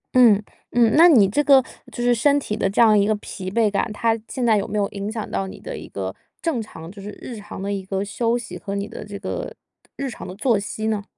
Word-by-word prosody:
嗯， 225 -5 +7 0.3
嗯， 235 -1 +4
那 335 +3 +8
你 220 -10 +6
这 290 +10 +1
个 275 -2 +7 0.3
就 240 - -4
是 245 - +4
身 280 +5 +3
体 210 -6 -3
的 195 - 0
这 195 - -2
样 220 -3 +7
一 200 0 +3
个 215 - +2
疲 190 -2 -7
惫 220 +1 +2
感， 210 +2 0
它 225 +1 +1
现 255 -3 -2
在 220 -2 +4
有 200 - -1
没 210 - -3
有 200 -1 +2
影 200 +1 -5
响 220 -2 -5
到 95 -1 -2
你 95 - -9
的 - - -7
一 - - -8
个 95 -1 -5 0.3
正 315 -9 0
常 165 -5 -10
就 200 0 -11
是 205 - -7
日 245 - -7
常 210 -2 -9
的 200 +1 -2
一 195 -1 -3
个 195 +1 -2
休 230 +3 0
息 185 -7 -7
和 200 - -5
你 200 +1 -2
的 - - -8
这 200 -1 -7
个 195 - -5 0.4
日 275 -1 -3
常 - - -8
的 185 - -7
作 220 0 +2
息 215 +1 -5
呢？ 210 -2 -1
210 Hz, 285 characters per minute, -22 LUFS, 200-235 Hz, 0.4 s, 那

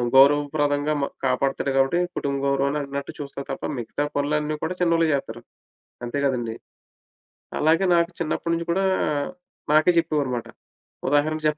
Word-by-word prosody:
గౌరవప్రదంగా 145 +1 +4
మ - - +2 0.2
కాపాడుతాడు 135 +1 0
గాబట్టి, 135 +6 +3 0.2
కుటుంబ 140 -1 -1
గౌరవం 140 +1 +1
అనన్నట్టు 140 0 -5
చూస్తారు 140 -1 -6
తప్ప, - - -6 0.2
మిగతా 120 +5 -3
పనులన్నీ 150 +1 0
కూడా 180 - -2
చిన్నోళ్ళే 165 -1 +3
జేత్తరు. 120 -4 -3 0.6
అంతే 120 +4 -3
కదండీ! 120 -4 -1 1.1
అలాగే, 165 +5 +4
నాకు 170 +1 +2
చిన్నప్పడినుంచి 170 +1 -1
కూడా 195 +2 +1 0.9
నాకే 155 +3 +6
చెప్పేవారుమాట. 145 -7 -1 0.6
ఉదాహరణకు 155 +2 +1
145 Hz, 120 wpm, -24 LUFS, 140-155 Hz, 1.1 s, నాకే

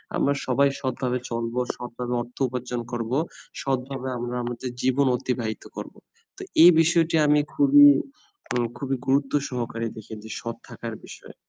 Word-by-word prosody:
আমরা 140 - +2
সবাই 140 +2 +4
সৎ 130 -1 -2
ভাবে 125 0 0
চলবো, 115 +1 -2 0.2
সৎভাবে 125 0 -5
অর্থ 120 +1 -11
উপার্জন 125 -1 -4
করব, 115 -1 -3 0.5
সৎভাবে 135 0 -2
আমরা 120 +1 -4
আমাদের 120 +1 -4
জীবন 130 +2 +2
অতিবাহিত 115 -4 -3
করব। - - -7 0.4
তো 390 - -9 0.2
এই 175 - +11
বিষয়টি 165 0 +3
আমি 150 0 +5
খুবই 290 0 +7 0.7
উম 120 -1 +1
খুবই 135 +1 -2
গুরুত্ব 135 +1 +2 0.2
সহকারে 115 -2 -3
দেখি 110 0 -10
যে 110 - -10
সৎ 115 -1 -4
থাকার 115 -1 -6
বিষয়ে। - - -12
125 Hz, 150 wpm, -25 LUFS, 120-140 Hz, 0.7 s, এই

